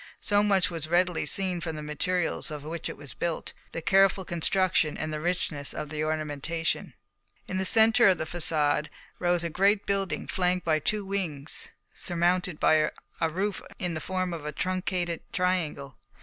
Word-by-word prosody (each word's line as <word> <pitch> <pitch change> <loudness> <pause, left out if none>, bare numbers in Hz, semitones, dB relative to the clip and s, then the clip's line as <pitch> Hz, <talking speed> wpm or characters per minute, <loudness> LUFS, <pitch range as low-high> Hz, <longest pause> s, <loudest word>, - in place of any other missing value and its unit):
So 205 0 +3
much 195 -3 +3
was 165 -2 -3
readily 175 0 +2
seen 185 -3 0
from 160 -2 -4
the 150 - -6
materials 165 +4 -1
of 150 -2 -6
which 160 +2 -4
it - - -7
was 145 -1 -9
built, 170 -2 -3 0.2
the 165 - -5
careful 195 0 +4
construction, 175 -2 +1
and 155 0 -3
the 155 - -2
richness 165 -4 -1
of 150 - -4
the 155 0 -2
ornamentation. 155 +1 -2 0.5
In 185 - -3
the 190 - 0
centre 225 +3 +6
of 185 -2 +5
the - - -2
façade 155 -2 +1 0.3
rose 175 -1 +2
a 170 - -1
great 200 +4 +3
building 195 -2 -1
flanked 180 0 0
by 155 -2 +3
two 210 +6 -1
wings 170 -7 -3 0.2
surmounted 175 -1 0
by 155 -1 +4 0.3
a 165 - +2
roof 195 +5 -2 0.2
in 175 -2 -2
the 155 - -4
form 185 -1 -2
of 165 -3 -6
a 150 - -3
truncated 180 0 -2
triangle. 165 -7 -1
175 Hz, 175 wpm, -28 LUFS, 155-185 Hz, 0.5 s, centre